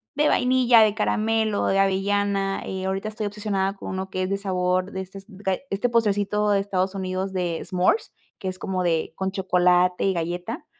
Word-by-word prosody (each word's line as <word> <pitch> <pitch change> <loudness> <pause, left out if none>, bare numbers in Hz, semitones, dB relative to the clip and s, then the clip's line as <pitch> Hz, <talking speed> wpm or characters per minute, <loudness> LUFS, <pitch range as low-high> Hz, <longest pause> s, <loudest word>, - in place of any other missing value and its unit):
de 300 +1 +3
vainilla, 250 -3 +4
de 215 -1 +4
caramelo, 220 -1 +1
de 195 - +2
avellana, 195 0 +1
eh, 190 0 -4
ahorita 195 +2 -2
estoy 215 0 -5
obsesionada 200 -2 -2
con - - -8
uno 190 0 -4
que 185 0 -1
es 185 - -2
de 195 - 0
sabor 185 -1 0
de 190 - -4
estes 195 +1 -10
gae 190 -1 -3
este 205 +5 0
postrecito 210 -2 +1
de 200 - +3
Estados 190 -1 -1
Unidos 190 0 -3
de 175 -3 -1
s'mores, 185 - +1 0.3
que 190 - -5
es 185 0 -4
como 185 -1 -2
de 165 -2 0
con 190 0 -2
chocolate 180 -1 +2
y 195 - +2
galleta, 175 - -4
195 Hz, 190 wpm, -24 LUFS, 185-205 Hz, 0.3 s, vainilla